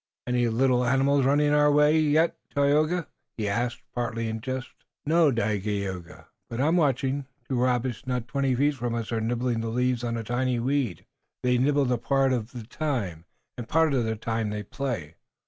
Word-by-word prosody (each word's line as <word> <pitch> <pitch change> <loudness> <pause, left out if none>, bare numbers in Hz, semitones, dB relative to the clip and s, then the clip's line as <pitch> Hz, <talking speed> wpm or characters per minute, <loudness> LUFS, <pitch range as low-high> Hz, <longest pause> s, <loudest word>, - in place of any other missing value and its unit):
"Any 125 -1 +1
little 125 +2 +2
animals 135 +2 +3
running 145 +1 +3
away 150 +1 +4
yet, 155 +2 +3 0.2
Tayoga?" 155 +4 +2 0.3
he 105 -2 -2
asked, 120 +4 -2
partly 115 -2 -2
in 110 0 -4
jest. 130 +1 -4 0.4
"No, 160 +1 +4
Dagaeoga, 100 -5 -3 0.2
but 115 - -5
I 135 - +2
am 165 - +2
watching. 135 -2 +1 0.2
Two 125 -2 0
rabbits 125 -1 0
not 125 -2 -2
twenty 140 -3 0
feet 145 +4 +2
from 120 -3 -3
us 115 -1 -4
are 115 -1 0
nibbling 120 +1 -1
the 115 - -3
leaves 125 +1 0
on 115 -1 -2
a 115 - -4
tiny 125 +2 0
weed, 125 - -1 0.4
that 125 - +1
is, 125 -1 +3
they - - +3
nibble 140 -3 +2
part 135 0 +2
of 115 -3 -2
the 120 -2 -7
time, 110 - -3 0.3
and 120 - -7
part 160 -2 +3
of 125 -3 +2
the 110 0 -1
time 115 0 -2
they 105 0 -4
play." 105 - -4
125 Hz, 185 wpm, -26 LUFS, 115-140 Hz, 0.4 s, away